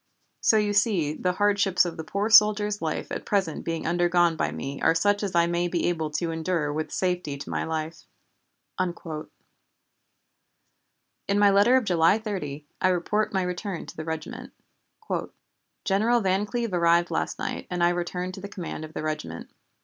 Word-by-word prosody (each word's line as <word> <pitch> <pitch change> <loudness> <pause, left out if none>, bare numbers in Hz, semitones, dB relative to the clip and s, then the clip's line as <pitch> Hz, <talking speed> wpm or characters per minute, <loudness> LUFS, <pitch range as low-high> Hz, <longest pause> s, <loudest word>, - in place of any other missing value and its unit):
So 220 - +4
you 210 -1 +1
see 200 -8 +2
the 180 +3 -1
hardships 200 -2 +3
of 170 -2 -4
the 160 - -6
poor 200 +6 -2
soldier's 210 -1 +5
life 160 -2 -3
at - - -4
present 190 -6 -1
being 165 -1 -3
undergone 175 0 +2
by 75 - -1
me 135 - -6
are - - +4
such 205 +4 +2
as 195 -4 -3
I 170 0 +5
may 170 +1 0
be 175 -1 -1
able 160 -3 -2
to 165 +1 -1
endure 160 -2 -1
with 155 +1 -3
safety 180 -6 -1
to 140 - -8
my - - -1
life!" 160 0 -4 0.7
In 180 -2 0 2.4
my 205 -1 +5
letter 205 +6 +5
of 255 - 0
July 175 0 +4
30, 155 -10 -5 0.2
I - - +4
report 185 +4 0
my 190 -2 0
return 180 0 -4
to - - -11
the 155 - -5
regiment: 160 -1 -6 1.3
"General 220 +5 +3
Van 195 +1 +1
Cleve 235 -3 -2
arrived 170 0 +3
last - - -1
night - - -4
and 175 -1 -1
I 175 - +5
returned 180 +1 -3
to 190 - -8
the 200 - -7
command 175 -5 -6
of 155 0 -10
the - - -3
regiment. 85 - -5
175 Hz, 175 wpm, -26 LUFS, 160-200 Hz, 2.4 s, soldier's